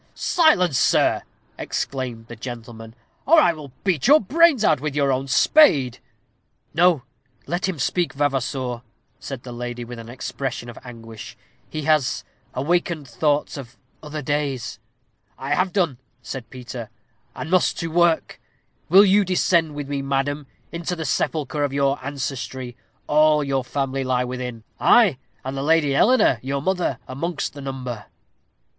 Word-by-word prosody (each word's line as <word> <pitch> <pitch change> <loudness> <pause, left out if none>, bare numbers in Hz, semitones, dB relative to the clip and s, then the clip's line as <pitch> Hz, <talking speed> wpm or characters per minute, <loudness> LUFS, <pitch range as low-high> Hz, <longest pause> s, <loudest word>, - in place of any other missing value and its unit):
"Silence, 180 - +3
sirrah!" - - +3 0.4
exclaimed 125 -4 -4
the 120 - -9
gentleman, 115 -1 -8 0.3
"or 325 +3 +7
I 175 - +4
will 150 -4 -10
beat 185 - +1
your 295 +3 +8
brains 290 - +4
out 130 - +3
with 150 -2 -3
your 140 -2 +2
own 135 +1 -1
spade." 135 - +4 0.7
"No; 170 -4 +4 0.4
let 180 +3 -1
him 180 - -3
speak, 175 +5 0
Vavasour," 135 -3 -1 0.4
said 135 -3 -7
the 125 - -8
lady, 120 0 -5
with 120 0 -8
an 115 0 -10
expression 125 0 -5
of - - -12
anguish 115 -3 -10 0.3
"he 155 -1 -4
has 150 -4 +2 0.3
awakened 160 +2 0
thoughts 145 +5 0
of 130 -3 -10 0.2
other 150 -1 -6
days." 140 -6 -2 0.6
"I 135 +2 -2
have 185 +4 +1
done," 170 -11 0 0.2
said 120 -4 -7
Peter, 125 -2 -8 0.5
"and 160 - -6
must 185 -1 +3
to 165 -1 -3
work. 170 -1 +2 0.5
Will 195 +5 +8
you 200 +1 +5
descend 170 -4 +2
with 145 -1 -5
me, 140 -1 -2
madam, 140 +1 -1 0.2
into 170 +1 -3
the 160 -2 -5
sepulchre 150 +1 -1
of 140 -1 -1
your 140 -1 +1
ancestry? 130 -2 -5 0.3
All 150 0 +4
your 135 -2 -1
family 135 +1 -2
lie 130 -1 +1
within 125 -2 -5 0.2
ay, 205 - +5 0.3
and 135 +1 -4
the 135 - -3
Lady 150 -1 +3
Eleanor, 210 - +4
your 140 +2 -2
mother, 180 -8 0
amongst 165 +6 -3
the 145 - -9
number." 130 -5 -6
140 Hz, 150 wpm, -22 LUFS, 125-165 Hz, 0.7 s, your